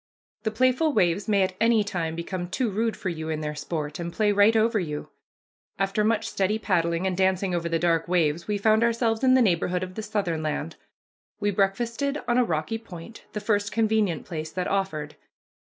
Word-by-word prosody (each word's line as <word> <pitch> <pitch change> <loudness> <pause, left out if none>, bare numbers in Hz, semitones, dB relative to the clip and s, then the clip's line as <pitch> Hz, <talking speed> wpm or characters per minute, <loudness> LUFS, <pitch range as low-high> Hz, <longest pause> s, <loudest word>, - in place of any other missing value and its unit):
The 220 - 0
playful 255 +7 +2
waves 175 0 +2
may 200 -3 +3
at 185 0 -1
any 230 -2 +4
time 170 -5 -3
become 175 +1 -4
too 220 +4 -1
rude 225 +3 -1
for 190 - -3
you 160 -2 -5
in 155 -1 -2
their 150 0 -3
sport, 150 +1 -4
and 170 0 -4
play 210 +4 +2
right 205 +2 +5
on 220 - +5
over 225 -1 +1
you. 150 -5 -5 0.7
After 195 +2 0
much 220 0 +1
steady 195 +2 0
paddling 170 -4 0
and 185 -1 0
dancing 190 0 +1
over 170 -1 -1
the 165 - +1
dark 165 -1 +1
waves 170 -2 +1
we 210 -1 0
found 220 +2 +3
ourselves 230 0 +1
in 260 0 +6
the 260 - +5
neighborhood 180 -2 +1
of 185 0 -6
the 220 - -5
southern 185 -7 -2
land. 155 - -3 0.6
We 205 - +1
breakfasted 230 +8 0
on 240 0 +3
a - - +5
rocky 165 +3 -2
point, 200 0 -11
the 210 - -2
first 205 -1 0
convenient 215 -7 +1
place 160 -1 -5
that 180 -1 -2
offered. 175 -7 -2
195 Hz, 205 wpm, -26 LUFS, 170-220 Hz, 0.7 s, in